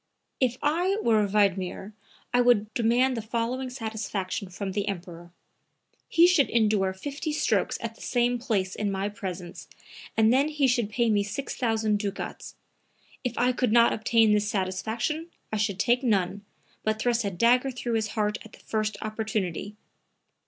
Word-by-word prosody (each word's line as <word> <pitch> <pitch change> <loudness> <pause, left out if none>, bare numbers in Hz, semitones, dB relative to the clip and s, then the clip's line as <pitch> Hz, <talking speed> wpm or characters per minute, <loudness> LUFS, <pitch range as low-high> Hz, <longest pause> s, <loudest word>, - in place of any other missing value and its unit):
"If 250 -2 +1
I 350 +7 +1
were 215 -3 +3
Wiedmer 195 0 0 0.4
I 245 - +5
would 225 -3 +3
demand 245 +3 +2
the 225 - -3
following 235 +4 -2
satisfaction 215 -5 -4
from 190 +1 -5
the 200 +2 -2
Emperor: 175 -3 -6 0.8
he 335 - +6
should 350 -6 +4
endure 210 -4 +2
50 285 - -5
strokes 300 - +1
at 230 -1 -4
the - - -18
same 245 -1 +1
place 200 -7 -1
in 205 -1 -1
my 195 +1 -1
presence 185 -4 -7 0.5
and 220 +1 +5
then 275 +3 +3
he 295 -2 +1
should 240 -4 +2
pay 235 +1 +1
me 205 -1 +3
6,000 220 -1 -1
ducats. 200 -1 -5 0.7
If 250 -2 -3
I 250 +1 +3
could 250 -2 0
not 235 +1 +5
obtain 225 0 +3
this 210 0 +2
satisfaction 220 - -2 0.3
I - - +1
should 205 -2 0
take 240 +4 +2
none, 200 -4 0 0.4
but 215 0 0
thrust 240 +1 +1
a 200 - 0
dagger 240 +8 +3
through 245 -2 -4
his 220 -1 +1
heart 210 0 0
at 220 - -15
the - - -14
first 215 -1 -2
opportunity. 215 -3 -3
220 Hz, 160 wpm, -27 LUFS, 205-245 Hz, 0.8 s, he